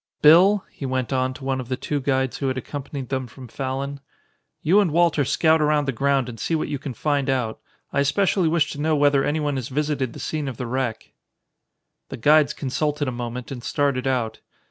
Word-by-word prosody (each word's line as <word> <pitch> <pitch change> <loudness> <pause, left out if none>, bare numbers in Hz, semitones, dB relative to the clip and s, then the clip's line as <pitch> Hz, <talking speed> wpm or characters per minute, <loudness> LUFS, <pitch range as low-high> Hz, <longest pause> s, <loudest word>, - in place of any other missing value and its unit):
Bill," 185 +7 +6
he 135 - -6
went 130 0 -1
on 130 0 +1
to 135 - -11
one 135 -1 -1
of 125 - -10
the 130 - -1
two 145 +2 -2
guides 130 -1 0
who 140 - -1
had 130 0 -1
accompanied 135 -1 -6
them 130 -2 -2
from 125 +2 -12
Fallon, 135 +3 -4 0.6
"you 185 +7 +5
and 200 -4 +3
Walter 165 -2 +3
scout 160 +4 +3
around 150 -1 +2
the - - +2
ground 135 0 +1
and 115 -2 -8
see 165 - -1
what 155 - -2
you 145 - -3
can 135 -3 -6
find 145 +1 0
out. 125 -4 -1 0.3
I - - +1
especially 175 +5 +2
wish 160 -2 +2
to 145 - -6
know 155 +1 +2
whether 145 -1 +3
anyone 145 -2 0
has 125 -3 -4
visited 145 -3 -1
the - - -9
scene 150 -2 -3
of 130 -4 -5
the 125 - -4
wreck." 120 -1 -3 1.0
The - - -6
guides 150 +4 +4
consulted 145 +1 -1
a - - -1
moment 120 +1 -5
and 125 -3 -6
started 140 -2 0
out. 125 -4 -1
140 Hz, 210 wpm, -23 LUFS, 130-150 Hz, 1.0 s, Bill